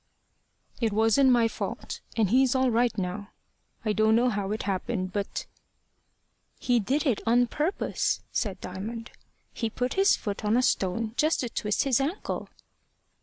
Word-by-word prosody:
"It 230 -3 +1
wasn't 225 +5 +4
my 240 -2 +5
fault, - - -5 0.2
and 210 -4 +2
he's 260 +1 +4
all 260 -1 +3
right 235 -1 +1
now. 200 +2 -3 0.6
I 215 - +2
don't 215 +1 +3
know 245 +2 +3
how 200 -3 -2
it 215 - -2
happened, 185 -1 -2
but 200 -1 -3 0.6
" - - -43
"He 245 -1 +2
did 270 +9 0
it 250 -7 +1
on 240 +2 +5
purpose," 305 +10 -1
said 195 -4 -2
Diamond. 220 +6 -6 0.4
"He 230 - -2
put 250 +3 -2
his 390 +1 +4
foot 205 0 -5
on 210 +3 +2
a 250 - +3
stone 215 +1 0
just 310 +2 +2
to 245 - -3
twist 210 -2 0
his 270 -2 +2
ankle." 320 +9 -3
225 Hz, 165 wpm, -27 LUFS, 205-250 Hz, 0.6 s, my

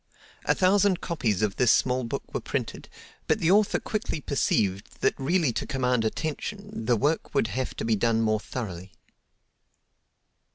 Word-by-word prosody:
A - - +3
thousand 195 -1 +3
copies 110 - -1
of 105 -2 0
this 125 -3 +5
small 130 0 +2
book 115 - -5
were - - -2
printed, - - -4 0.4
but - - +3
the 165 - +2
author 205 +1 +4
quickly 215 -7 -3
perceived 100 -9 -1
that - - +3
really 150 -1 +1
to - - -3
command 125 -3 +1
attention, 160 - -4
the 120 -2 +4
work 145 +5 -1
would 115 -5 +2
have 130 0 -3
to - - -4
be 115 -1 +2
done 115 +2 +1
more 110 -1 +2
thoroughly. 95 -6 -6
125 Hz, 160 wpm, -26 LUFS, 110-170 Hz, 0.4 s, this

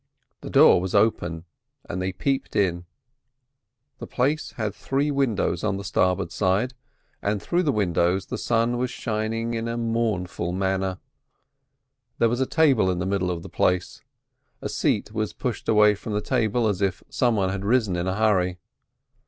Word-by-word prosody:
The - - -8
door - - +6
was 95 +1 -3
open, 90 -6 +1 0.4
and 90 - -4
they 95 +1 -1
peeped 135 +8 -2
in. 90 -3 +1 1.1
The - - -7
place 145 +5 -1
had 110 -4 -3
three 140 +2 -1
windows 115 - 0
on 100 -2 0
the 100 - -6
starboard 90 -2 0
side, 100 +8 +1 0.5
and 100 0 0
through 175 - 0
the 155 -5 +1
windows 95 -3 +1
the - - -5
sun 120 +1 +1
was 125 0 0
shining 115 0 -2
in 115 0 -2
a 115 0 -3
mournful 110 -7 -1
manner. 95 0 -1 1.2
There 115 - +3
was 120 +3 -1
a 130 - +1
table 135 - +3
in 90 - 0
the 90 - -2
middle 95 -1 0
of 85 -2 -3
the - - -8
place. 90 -1 0 0.6
A - - -5
seat - - 0
was 110 -1 -2
pushed 125 -5 -4
away 105 -1 +6
from 105 +1 -6
the 105 - 0
table 110 +2 +1
as 100 -2 -1
if 95 -2 -1
some 120 -3 +1
one 95 -3 +1
had 100 +1 -3
risen 110 -3 +2
in 85 +1 -2
a 95 - 0
hurry. 95 -5 +2
105 Hz, 175 wpm, -24 LUFS, 95-115 Hz, 1.2 s, door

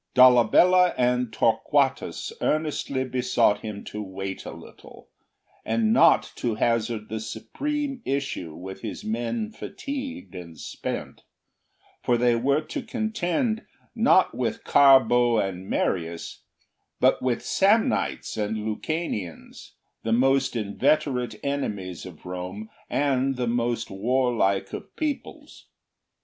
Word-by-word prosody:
Dolabella 130 +9 +6
and 125 -1 +1
Torquatus - - +1
earnestly 150 -3 0
besought 125 -5 +2
him 105 -2 -7
to 105 - -6
wait 95 -1 -6
a - - -5
while, - - -14 0.5
and 110 -1 +1
not - - +5
to 115 -3 -1
hazard 115 -1 0
the 110 - -4
supreme 275 - -4
issue 135 - -3
with 95 +3 -8
his 110 - -6
men 120 - -2
fatigued 270 +3 -6
and 85 -3 -9
spent; - - -5 0.8
for 120 - +2
they 120 0 +3
were 140 +5 +2
to 290 - -5
contend 220 -1 -1 0.3
not 225 -5 +4
with 115 -2 -2
Carbo 125 -4 +5
and 95 -2 -2
Marius, 85 -2 -2 0.5
but - - +3
with 125 -2 -1
Samnites 210 - +1
and 105 0 -1
Lucanians, 110 - -4 0.3
the 115 - -3
most 135 +2 +2
inveterate 120 +2 0
enemies 100 - -3
of 90 -2 -13
Rome, 90 +4 -6 0.2
and 135 -1 +1
the 125 -1 -1
most 120 0 -1
warlike 105 -3 +1
of - - -8
peoples. 305 -2 -5
120 Hz, 115 wpm, -25 LUFS, 105-145 Hz, 0.8 s, Dolabella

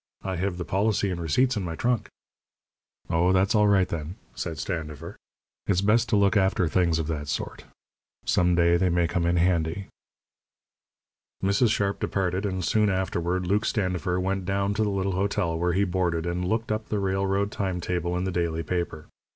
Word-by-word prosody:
"I 95 -1 -3
have 95 0 -2
the 90 - -4
policy 100 0 +1
and 85 -1 -4
receipts 125 - +2
in 105 - -1
my 85 -3 -4
trunk." 120 -2 0 1.0
"Oh, 85 +3 +2
that's 95 +2 +3
all 105 -1 +4
right, 100 -2 +4
then," 80 +2 -5 0.2
said 80 -2 -4
Standifer. 80 -1 -5 0.5
"It's 95 -2 +2
best 110 +3 +3
to - - +2
look 100 0 +3
after 95 -3 +2
things 85 -1 +2
of 80 - -1
that 75 -2 -3
sort. - - -4 0.6
Some 90 -1 +3
day 85 0 +4
they 90 +1 +2
may 85 -1 +2
come 85 0 0
in 85 - +2
handy." 85 +1 0 1.5
Mrs. 100 +4 +3
Sharp 100 -2 0
departed, 95 +1 -1
and 95 -2 -2
soon 105 -1 +2
afterward 95 -1 -1
Luke 100 +4 +1
Standifer 90 -4 -1
went 95 +1 -1
down 100 +2 0
to 105 - -1
the 105 - 0
little 100 -1 -1
hotel 95 -2 0
where 90 0 +1
he 100 +3 +2
boarded 90 -3 0
and 90 +1 -2
looked 110 +2 -1
up 110 0 -3
the 105 - 0
railroad 95 +1 0
time 95 -3 -2
table 90 0 -2
in 90 - -1
the 95 - -1
daily 85 -2 -1
paper. 85 -4 -3
95 Hz, 185 wpm, -26 LUFS, 85-100 Hz, 1.5 s, all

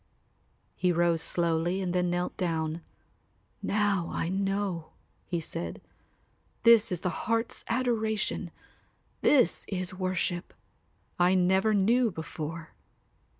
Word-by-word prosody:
He 180 -1 +2
rose 170 -1 +2
slowly 170 +2 0
and 180 -2 -2
then 180 -1 +1
knelt 175 +1 -1
down. 165 -2 -1 0.8
"Now 200 -4 +1
I 165 - -2
know," 195 -3 -2 0.3
he 175 - -1
said, 85 - -5 0.8
"this 230 -3 +6
is 180 -1 -2
the 180 +4 -3
heart's 230 +1 0
adoration, 225 -4 0 0.7
this 255 -12 +4
is 185 -2 -3
worship. 185 -1 -2 0.6
I 180 +1 +4
never 190 +4 +3
knew 230 +5 +3
before." 160 -2 -6
180 Hz, 110 wpm, -29 LUFS, 170-205 Hz, 0.8 s, this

